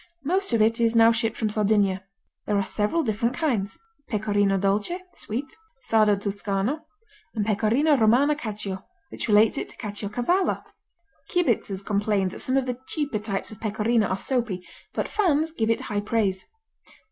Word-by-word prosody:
Most 375 +5 +1
of 225 -2 +4
it 225 +2 +2
is 230 0 +2
now 230 0 +7
shipped 225 0 0
from 215 -2 0
Sardinia. 205 -3 +2 0.4
There 210 - +2
are 200 - +1
several 210 - 0
different 230 +1 0
kinds: 225 -10 -1 0.3
Pecorino 205 -2 +1
Dolce 205 - 0
(sweet), 260 +2 -5 0.3
Sardo 215 -2 +4
Tuscano, 200 +6 -1 0.6
and 210 -2 0
Pecorino 225 +8 +3
Romano 255 +5 +4
Cacio, 210 -8 -5 0.3
which - - -5
relates 210 0 +4
it - - -5
to - - -10
Caciocavallo. 225 - -1 0.7
Kibitzers 235 - 0
complain 205 -2 +1
that - - -9
some 260 +1 0
of 270 - +1
the 250 -1 -3
cheaper 285 -8 -2
types 205 -1 -3
of 215 - -12
Pecorino 215 0 +1
are 190 - -1
soapy, 225 -7 -2 0.3
but - - -2
fans 325 -6 +1
give 225 -8 -1
it 230 - +1
high 205 -1 -2
praise. 205 -3 0
220 Hz, 160 wpm, -25 LUFS, 205-250 Hz, 0.7 s, now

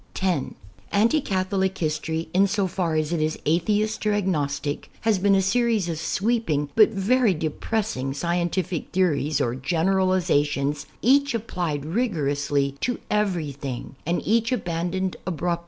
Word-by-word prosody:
(10) 180 -8 -1 0.4
Anti 230 +9 +3
Catholic 190 -2 -1
history, 160 0 -2
in 195 +2 +4
so 200 0 0
far 175 -3 -1
as 155 +1 0
it 165 - 0
is 155 0 0
atheist 210 +7 +1
or 210 - +3
agnostic,, 145 -7 -1
has 220 -3 +2
been 195 +1 +4
a 190 - +3
series 225 -1 +1
of 165 -2 -3
sweeping 185 -6 0
but 215 -2 +7
very 220 +1 +2
depress 200 +8 -2
ing 130 +1 -3
scientific 170 +2 -1
theories 155 -5 +1
or 120 - 0
generalizations, 160 -2 +1 0.2
each 280 +1 +4
applied 175 -10 -3
rigorously 145 - 0
to 245 - 0
everything 150 -11 -2
and 170 +2 -1
each 230 +3 +2
abandoned 180 -3 -2
abrupt! 175 -1 -1
180 Hz, 140 wpm, -24 LUFS, 155-205 Hz, 0.4 s, but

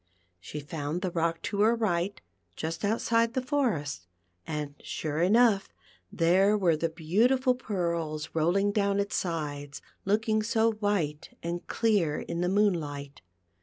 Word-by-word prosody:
She 150 +12 -7
found 150 +4 -4
the 185 - -1
rock 165 0 -1
to 205 -1 -1
her 225 +3 +5
right 195 -4 -1 0.4
just 160 +3 -4
outside 230 +3 +1
the - - +2
forest, 200 - -1 0.4
and, 150 -2 -3
sure 155 0 -3
enough, 210 +1 +4 0.4
there 190 +5 +4
were 175 -5 +3
the 165 +2 -1
beautiful 225 - +2
pearls 170 -9 -2
rolling 180 +6 +2
down 200 -1 +1
its 200 0 -1
sides, 145 -5 -3
and 195 - -8
looking 215 +1 +2
so 225 +1 +2
white 205 -9 -2
and 170 +1 -4
clear 200 -10 +1
in 170 0 -4
the 180 - +1
moonlight. 155 -9 0
180 Hz, 140 wpm, -28 LUFS, 160-215 Hz, 0.4 s, her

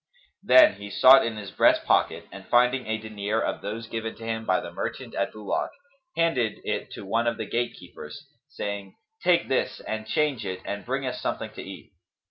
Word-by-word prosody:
Then 310 -1 +7
he 100 - -8
sought 130 +6 +7
in 115 -2 -3
his 100 -3 -7
breast - - +4
pocket - - +2
and, - - -11
finding 125 +1 +3
a 110 0 0
dinar 110 0 -3
of - - -2
those 115 +2 -5
given 115 0 -4
to 115 - -10
him 110 0 -3
by 95 - +3
the 85 - -7
merchant - - -5
at 100 - -1
Bulak, 105 -2 -2 0.5
handed 135 -10 +1
it - - -3
to - - -8
one 115 +4 0
of 115 -1 0
the 110 - -3
gatekeepers, 100 -10 -5 0.2
saying, 100 -2 -5 0.3
"Take 175 -1 +3
this 130 - 0
and 110 0 -5
change 145 -3 0
it 95 -1 -4
and 100 +3 -5
bring 135 +2 -1
us 125 - -4
something - - -3
to - - -8
eat." - - -10
110 Hz, 195 wpm, -26 LUFS, 100-125 Hz, 0.5 s, Then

